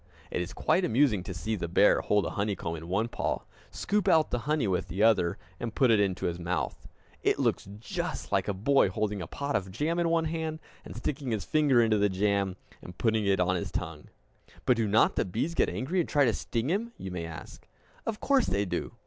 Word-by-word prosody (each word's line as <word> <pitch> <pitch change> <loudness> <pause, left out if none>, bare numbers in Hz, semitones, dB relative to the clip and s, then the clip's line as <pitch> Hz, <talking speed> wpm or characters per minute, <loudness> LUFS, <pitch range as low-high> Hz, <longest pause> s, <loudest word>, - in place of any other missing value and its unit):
It - - -1
is 90 - -4
quite 185 - +1
amusing 120 - +3
to - - -5
see 110 +5 -2
the 85 - -3
bear 95 +4 +4
hold 105 -1 +2
a - - -3
honeycomb 100 -5 -2
in 80 +1 -8
one 100 +6 0
paw, - - -2 0.3
scoop 205 0 -1
out 160 -4 +4
the 120 - 0
honey 150 -7 +2
with 95 0 -1
the 95 +4 -1
other, 95 -7 +3 0.2
and 115 -2 -4
put 130 -4 +4
it 110 - +5
into 95 -3 0
his 85 0 -2
mouth. 90 +1 -3 0.3
It - - +2
looks - - 0
just 110 - -4
like - - +1
a 100 - 0
boy 125 +3 +3
holding 105 0 -2
a 85 - -5
pot 140 - -3
of 95 -2 -1
jam 150 - -1
in 170 -1 +2
one 165 -1 +2
hand, 160 0 -2 0.3
and - - -10
sticking 140 -2 -3
his 110 -3 -2
fingers 140 -6 +4
into 110 -2 +2
the 105 0 +3
jam 100 -1 0 0.3
and 90 - -11
putting 110 -3 +1
it 95 -1 +3
on 90 0 +2
his 85 - -3
tongue! - - -5 0.6
"But 125 - +4
do 115 -2 +1
not 105 +3 +3
the - - +3
bees 115 - -2
get - - +2
angry, 165 +9 -2
and 170 - 0
try 145 -1 +4
to 115 - +2
sting 115 +3 -2
him?" 230 +5 -1
you 95 - -6
may 85 -2 -4
ask. 80 -2 -10 0.4
Of 225 -2 -3
course 275 -4 +2
they 100 +1 0
do. 90 - -3
110 Hz, 230 wpm, -29 LUFS, 95-145 Hz, 0.6 s, it